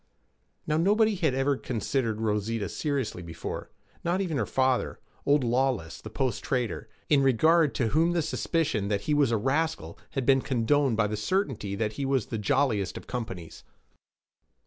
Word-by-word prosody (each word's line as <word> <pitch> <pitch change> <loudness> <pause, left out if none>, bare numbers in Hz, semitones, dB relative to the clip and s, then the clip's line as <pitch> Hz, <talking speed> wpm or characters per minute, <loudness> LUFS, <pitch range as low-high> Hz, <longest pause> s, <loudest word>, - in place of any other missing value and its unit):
Now, 155 0 +1
nobody 210 +6 +3
had 165 -9 0
ever 135 +1 +2
considered 115 -2 -2
Rosita 105 -1 -1
seriously 135 - -2
before; 85 -1 -6 0.3
not 175 +2 0
even 175 -6 -1
her 105 - -1
father, 130 -1 +1 0.3
old 145 -1 +4
Lawless 120 -8 0
the 110 - -8
post 130 +1 -2
trader, 120 -3 -2 0.2
in 145 -2 +4
regard 150 +4 +4
to 115 -4 +1
whom 165 +7 +2
the 170 -2 +1
suspicion 155 - -1
that 100 -1 0
he 150 - -1
was 145 -3 +3
a 115 - +2
rascal 135 - -1
had 135 -2 -1
been 135 0 +4
condoned 130 0 +1
by 115 - +3
the 105 +1 -2
certainty 110 - -1
that 110 +1 -1
he 140 - -3
was 135 -4 +1
the 115 - -4
jolliest 110 -4 +1
of - - -9
companions. 95 -10 -6
130 Hz, 170 wpm, -27 LUFS, 110-150 Hz, 0.3 s, old